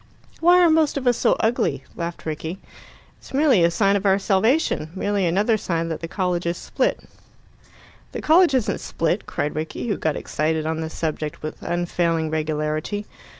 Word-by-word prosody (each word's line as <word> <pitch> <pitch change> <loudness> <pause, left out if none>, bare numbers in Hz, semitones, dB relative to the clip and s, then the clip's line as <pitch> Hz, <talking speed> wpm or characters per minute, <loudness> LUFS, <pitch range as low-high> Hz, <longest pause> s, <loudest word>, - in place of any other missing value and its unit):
"Why 350 +2 +6
are 345 - +6
most 315 -2 +2
of 270 - -4
us 245 -1 +4
so - - +3
ugly?" 185 - 0
laughed 170 0 -5
Rickie. 160 +3 -4 0.6
"It's - - -10
merely 275 - +4
a 170 - +5
sign 195 +3 +2
of 200 - 0
our 195 -1 +4
salvation 205 - +1
merely 200 -1 0
another 205 +6 +2
sign 165 -4 -2
that 160 - -3
the 165 - -5
college 180 -1 -1
is 170 - -1
split." - - -1 1.1
"The - - -5
college 325 -2 +4
isn't 250 -5 0
split," 165 +5 -1
cried 150 - -2
Rickie, 160 +9 -4
who 205 - 0
got 155 -2 -1
excited 155 +1 -1
on 160 0 -2
this 160 0 -5
subject 155 -2 -3
with 155 - -6
unfailing 170 -2 -1
regularity. 155 +5 -2
175 Hz, 175 wpm, -22 LUFS, 160-215 Hz, 1.1 s, Why